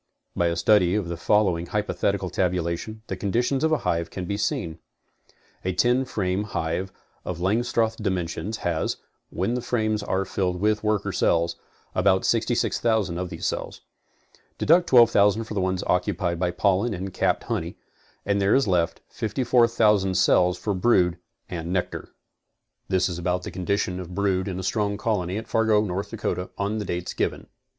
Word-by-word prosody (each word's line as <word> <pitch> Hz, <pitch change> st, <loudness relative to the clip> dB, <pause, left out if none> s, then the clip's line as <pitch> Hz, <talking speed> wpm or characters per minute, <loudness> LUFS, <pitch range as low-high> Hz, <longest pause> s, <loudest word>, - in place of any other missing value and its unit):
By.a 85 Hz, -1 st, +1 dB
study 95 Hz, -1 st, +4 dB
of 100 Hz, -5 st, -1 dB
the 85 Hz, -, -3 dB
following 90 Hz, -1 st, +1 dB
hypothetical 100 Hz, -3 st, -1 dB
tabulation, 90 Hz, +4 st, -2 dB
the -, -, -4 dB
conditions 120 Hz, +7 st, 0 dB
of 160 Hz, -, +2 dB
a 155 Hz, -, +4 dB
hive 85 Hz, 0 st, 0 dB
can 95 Hz, -, -5 dB
be 100 Hz, -, -2 dB
seen. 85 Hz, -5 st, -2 dB, 0.8 s
A 95 Hz, -, -1 dB
ten 125 Hz, +7 st, +2 dB
frame 95 Hz, -5 st, -1 dB
hive 95 Hz, -1 st, -2 dB, 0.3 s
of 90 Hz, -2 st, -5 dB
Langstroth 110 Hz, +3 st, +1 dB
dimentions 95 Hz, +1 st, -2 dB
has, 85 Hz, -3 st, 0 dB, 0.3 s
when 95 Hz, +7 st, -1 dB
the 125 Hz, -, -1 dB
frames 110 Hz, -3 st, 0 dB
are 95 Hz, -1 st, -1 dB
filled 90 Hz, -2 st, -1 dB
with 105 Hz, +2 st, +1 dB
worker 105 Hz, -2 st, 0 dB
cells, 85 Hz, -2 st, +1 dB, 0.4 s
about 95 Hz, 0 st, +2 dB
66,000 110 Hz, -5 st, +1 dB
of 90 Hz, -1 st, -3 dB
these -, -, -6 dB
cells. -, -, -3 dB, 0.8 s
'Deduct 170 Hz, +3 st, +4 dB
12,000 110 Hz, -3 st, +5 dB
for 110 Hz, -, -7 dB
the 100 Hz, -, 0 dB
ones 95 Hz, 0 st, -1 dB
occupied 90 Hz, -1 st, 0 dB
by 90 Hz, -1 st, +1 dB
pollen 100 Hz, +5 st, +1 dB
and 95 Hz, +1 st, -5 dB
capped -, -, +1 dB
honey -, -, -3 dB, 0.5 s
and 100 Hz, 0 st, +1 dB
there 100 Hz, +1 st, +4 dB
is 135 Hz, -2 st, +3 dB
left 85 Hz, -3 st, +1 dB
54,000 110 Hz, -4 st, +2 dB
cells 90 Hz, 0 st, +3 dB
for 105 Hz, -, -2 dB
brood 90 Hz, -4 st, +2 dB, 0.3 s
and 85 Hz, -1 st, -5 dB
nectar. 90 Hz, -1 st, -2 dB, 0.8 s
This 95 Hz, -1 st, +2 dB
is 90 Hz, -2 st, -4 dB
about 90 Hz, +1 st, -1 dB
the -, -, -6 dB
condition 90 Hz, 0 st, -1 dB
of 90 Hz, -1 st, -8 dB
brood 95 Hz, -1 st, 0 dB
in 95 Hz, -2 st, -3 dB
a -, -, -5 dB
strong 100 Hz, +1 st, 0 dB
colony 100 Hz, -4 st, -1 dB
at 110 Hz, +1 st, -6 dB
Fargo, 110 Hz, -2 st, +3 dB
North 100 Hz, +1 st, -3 dB
Dakota 90 Hz, -5 st, -3 dB
on 100 Hz, +2 st, -1 dB
the 105 Hz, -, -4 dB, 0.3 s
given -, -, -1 dB
dates. -, -, -23 dB
95 Hz, 165 wpm, -25 LUFS, 90-110 Hz, 0.8 s, 12,000